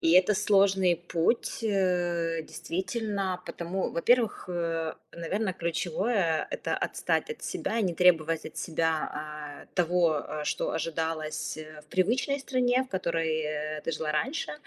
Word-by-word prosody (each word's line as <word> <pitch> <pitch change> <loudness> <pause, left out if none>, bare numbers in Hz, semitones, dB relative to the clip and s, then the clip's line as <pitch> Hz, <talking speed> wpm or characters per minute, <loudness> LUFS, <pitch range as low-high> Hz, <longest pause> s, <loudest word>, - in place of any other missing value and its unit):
И 165 - +4
это 185 +3 +6
сложный 195 -3 +4
путь, 175 +7 0
э, 175 -5 +1
действительно, 190 +1 -3
потому 175 +3 -2
во-первых, 230 +2 +2
э, 165 -2 -1 0.2
наверное, 190 +4 -1
ключевое- 170 +1 0
это - - -2
отстать - - 0
от 460 - -7
себя 230 - -2
и - - +2
не 180 -4 0
требовать 165 -2 +4
от - - -9
себя, 160 -1 0
а, 150 -1 -7
того, 175 -1 +3 0.2
э, 150 0 -4
что - - -1
ожидалось 160 -1 -2 0.3
в 150 - -23
привычной 245 +9 +2
стране, 255 -1 +2
в - - -17
которой, 165 -4 0
э, 150 0 -3
ты 165 - -1
жила 155 0 -2
раньше. 265 - -1
175 Hz, 140 wpm, -29 LUFS, 160-195 Hz, 0.3 s, это